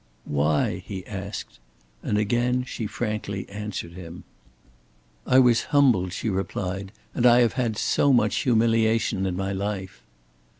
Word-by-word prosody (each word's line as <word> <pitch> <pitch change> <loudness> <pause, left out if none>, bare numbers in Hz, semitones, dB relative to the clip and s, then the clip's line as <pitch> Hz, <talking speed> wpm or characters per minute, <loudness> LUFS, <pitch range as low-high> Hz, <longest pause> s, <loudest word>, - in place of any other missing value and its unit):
"Why?" 75 +1 0
he 95 -1 -7
asked; 100 0 -7 0.4
and 105 - -1
again 120 +4 +1
she 120 -3 -5
frankly 105 -1 -4
answered 100 -4 -6
him. 85 -1 -9 1.0
"I 130 - +4
was 125 -3 +5
humbled," 125 -11 +3
she 95 - -4
replied, 95 -1 -3 0.2
"and 120 - -1
I 120 +1 +6
have 120 - +3
had 115 -4 -1
so 140 - +2
much 125 - +3
humiliation 115 -4 +2
in 90 -1 -3
my 95 0 -2
life." 95 -1 -4
105 Hz, 135 wpm, -25 LUFS, 95-120 Hz, 1.0 s, I